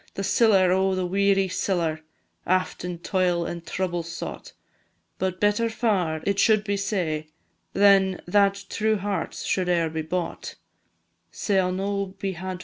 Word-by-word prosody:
The 195 - -3
siller, 195 -3 +4
O 190 +1 +2
the 185 -1 -1
weary 195 +1 +2
siller! 175 -4 -1 0.5
Aft 185 0 0
in 180 -1 -4
toil 175 -1 0
and 170 0 -5
trouble 175 +1 -2
sought, 165 0 -7 0.7
But 185 0 -2
better 210 +3 +2
far 190 -9 0
it 200 0 0
should 215 -2 +4
be 205 -1 -1
sae, 175 -7 -2 0.5
Than 195 -2 +4
that 200 +1 +2
true 220 0 0
hearts 195 -3 -3
should 185 -2 0
e'er 170 -2 +1
be 160 0 -2
bought. 165 +2 -4
185 Hz, 130 wpm, -25 LUFS, 175-200 Hz, 0.7 s, siller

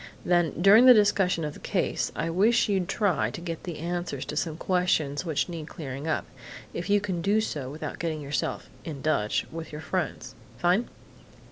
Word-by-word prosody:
"Then, 175 -3 +2
during 205 +7 +7
the 250 - +10
discussion 195 -5 +3
of 150 - -4
the - - -12
case, - - -1
I 165 - -2
wish 215 +7 +3
you'd 190 -4 0
try 200 -5 +1
to - - -7
get 170 -1 -6
the 170 -4 -5
answers 175 -4 -3
to - - -5
some 160 0 -2
questions 175 -5 0
which 155 -3 0
need 165 -4 -6
clearing 140 -3 -6
up 160 - 0 0.5
if 175 +3 -4
you 205 0 +5
can 190 -4 -3
do 205 +4 +2
so 145 -11 -3
without 150 +3 -6
getting 160 -2 -2
yourself 145 -1 -3 0.2
'in 145 -5 -7
Dutch' 110 -9 +1
with 165 0 -7
your 150 0 -7
friends.... - - -3 0.2
Fine! 180 +7 +2
170 Hz, 190 wpm, -27 LUFS, 155-190 Hz, 0.5 s, the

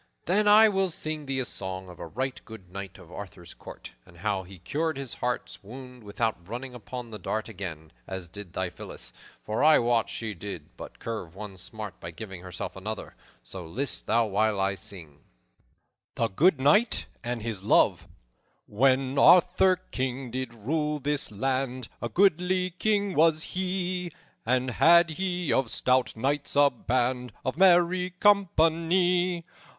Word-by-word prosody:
"Then 205 +4 +2
I 215 +2 +8
will 195 -2 +1
sing 155 -3 -5
thee 135 -1 -1
a - - -2
song 95 -3 -5
of 90 -1 -12
a 85 - -6
right 130 +9 -3
good 105 -6 -12
knight 100 -1 -7
of - - -15
Arthur's - - -9
court, - - -11
and 85 - -18
how 100 +1 -1
he 95 +1 -12
cured 155 - -2
his 135 -3 -6
heart's 125 0 -3
wound 125 +3 -11
without 105 -3 -3
running 125 +3 -6
upon 125 0 -8
the 105 - -7
dart 110 +4 -3
again, 85 -7 -7 0.2
as 95 -2 -6
did 95 0 -10
thy 90 -1 -2
Phillis; - - -10 0.3
for 110 +5 -1
I 155 +1 +7
wot 120 -1 +2
she 110 -2 -4
did 90 -4 -8
but - - -10
cure 110 -6 -4
one 95 +4 -9
smart 100 +1 -8
by 85 - -7
giving 95 +1 -8
herself 90 -1 -6
another. 105 +3 -6 0.3
So, 90 +9 -8
list 130 +10 -4
thou 115 +1 +3
while 105 0 +1
I 95 0 +1
sing:" 85 -6 -11 1.0
THE 115 - 0
GOOD 155 - +3
KNIGHT 155 - +3 0.2
AND 120 -2 -3
HIS 110 -5 -4
LOVE - - +3 0.6
"_When 130 +4 +2
Arthur, 180 +3 +6 0.2
King, 130 -1 -3
did 130 -1 -3
rule 150 +7 -1
this 145 -2 -1
land, 130 +2 -2
A 120 - -2
goodly 185 - +2
king 200 +1 0
was 160 0 +4
he, 180 -1 -2 0.4
And 130 +1 +1
had 170 +5 +6
he 180 -2 -1
of 130 -3 +1
stout 130 +2 +1
knights 140 +6 -1
a 145 0 +6
band 125 +1 -1
Of 130 - -1
merry 180 0 +4
company. 175 -2 +3
125 Hz, 160 wpm, -27 LUFS, 105-165 Hz, 1.0 s, I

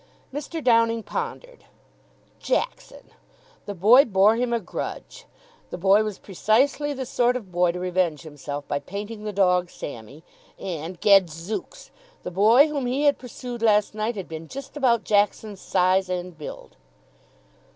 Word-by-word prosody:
Mr. 300 +2 -5
Downing 230 -2 +3
pondered. - - -6 0.7
Jackson! - - -3 0.6
The 205 - -5
boy 225 +9 +7
bore 205 0 +4
him 245 +1 -1
a 235 - +1
grudge. 225 - -7 0.4
The - - -6
boy 195 +4 +4
was 215 -3 -4
precisely 260 +9 +1
the 265 -2 -4
sort 245 0 +1
of 210 -7 -6
boy 175 0 +2
to 180 - -5
revenge 180 -3 -1
himself 145 -2 -7
by 145 - -1
painting 205 +7 -7
the 210 - -2
dog 180 -3 +2
Sammy. 135 +3 -9 0.3
And, 170 -1 -6
gadzooks! 190 -1 +1 0.3
The - - -5
boy 220 - +5
whom 285 -4 -3
he 265 +4 -1
had 285 -1 +3
pursued 245 -1 -8
last 210 -2 +3
night 215 +2 -2
had 195 -3 -6
been 160 0 -8
just 275 - -9
about 245 -6 +2
Jackson's 205 -1 0
size 185 0 +2
and 180 -1 -4
build! 155 -1 -10
210 Hz, 150 wpm, -24 LUFS, 180-245 Hz, 0.7 s, boy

